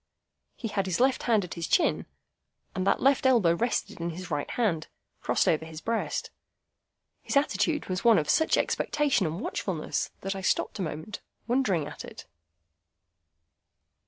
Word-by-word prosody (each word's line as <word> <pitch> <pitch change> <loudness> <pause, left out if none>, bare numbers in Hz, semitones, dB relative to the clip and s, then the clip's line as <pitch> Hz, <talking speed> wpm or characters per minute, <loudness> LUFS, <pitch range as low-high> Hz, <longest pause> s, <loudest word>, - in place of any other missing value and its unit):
He 230 - -5
had 195 -2 -1
his 180 - -1
left 260 +1 +3
hand 220 -4 +4
at 180 - -6
his 170 -2 -4
chin, - - +2 0.7
and 190 0 -2
that 195 - +2
left 270 -1 +4
elbow 225 -10 +4
rested 230 -2 -2
on 170 - -1
his 175 +1 -7
right 145 -1 -2
hand, 185 -10 0 0.3
crossed - - +1
over 160 0 +2
his 160 -1 -8
breast. 230 +5 -2 0.9
His - - 0
attitude 300 +1 +1
was 185 0 -3
one 230 -3 +6
of 150 - 0
such 320 - +3
expectation 285 - +1
and 160 +3 -4
watchfulness 175 -6 -2
that 195 +1 -3
I 190 - -5
stopped 190 - 0
a - - -1
moment, 165 +5 -5 0.2
wondering 225 - +1
at - - -8
it. - - -10
195 Hz, 160 wpm, -28 LUFS, 170-240 Hz, 0.9 s, one